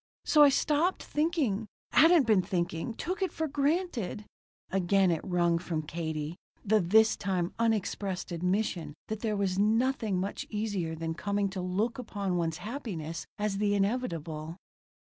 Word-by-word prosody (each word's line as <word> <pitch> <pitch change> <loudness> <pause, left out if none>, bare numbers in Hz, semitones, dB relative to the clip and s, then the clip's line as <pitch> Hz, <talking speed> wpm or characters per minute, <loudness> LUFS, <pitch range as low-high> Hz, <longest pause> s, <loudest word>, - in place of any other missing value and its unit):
So 300 - +5
I 290 - +9
stopped 300 +6 +1
thinking 295 - 0 0.2
hadn't 325 -2 +6
been 215 -4 +4
thinking 175 +3 -2
took 370 - -4
it 380 - 0
for 320 -1 -2
granted 280 - -1 0.2
" - - -
Again 190 0 +3
it 165 - 0
wrung 175 -2 +2
from 165 -3 -3
Katie 160 0 -4 0.3
the 215 +1 +4
this 220 +5 +4
time 185 -3 -1
unexpressed 205 -4 -1
admission 175 -3 -1
that 220 -1 -3
there 215 -2 -1
was 195 -1 0
nothing 220 -2 +2
much 195 +2 -3
easier 205 -6 -2
than 165 0 -3
coming 200 +3 -1
to 190 -1 -4
look 205 +7 -1
upon 200 -6 -3
one's 165 -2 -1
happiness 185 - -5
as 205 -1 -1
the 205 -1 +2
inevitable. 170 - -2
200 Hz, 150 wpm, -30 LUFS, 175-230 Hz, 0.3 s, I